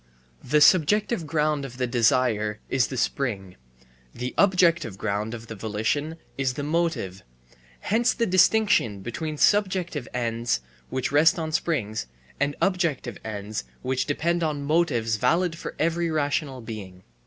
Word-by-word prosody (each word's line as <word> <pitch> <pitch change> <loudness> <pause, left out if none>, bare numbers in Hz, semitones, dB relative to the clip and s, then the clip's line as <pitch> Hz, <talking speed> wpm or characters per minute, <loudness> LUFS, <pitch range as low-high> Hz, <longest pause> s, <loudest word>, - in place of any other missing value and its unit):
The 150 +3 +2
subjective 185 +3 +4
ground 150 -1 0
of 125 -2 -8
the 125 - 0
desire 115 -3 +1
is 130 -3 +2
the 130 - -6
spring, 105 -8 -2 0.6
the 125 +1 -4
objective 170 - +3
ground 105 +2 -2
of 115 0 -9
the 115 - -7
volition 110 +9 -2 0.2
is 130 -2 +1
the 145 - -4
motive; 155 - -1 0.6
hence 230 +4 +2
the 235 - +1
distinction 185 - +3
between 150 +9 -4
subjective 185 - +1
ends 115 - -1 0.3
which 130 0 -2
rest 150 +4 +5
on 160 -1 -3
springs, 120 - -1 0.3
and 145 0 0
objective 170 - 0
ends 105 -3 -5 0.2
which 130 0 -1
depend 170 +4 0
on 150 -3 -1
motives 140 -8 +1
valid 170 - +1
for - - -7
every 170 +1 0
rational 145 -3 -1
being. 100 -5 -8
140 Hz, 140 wpm, -25 LUFS, 115-165 Hz, 0.6 s, rest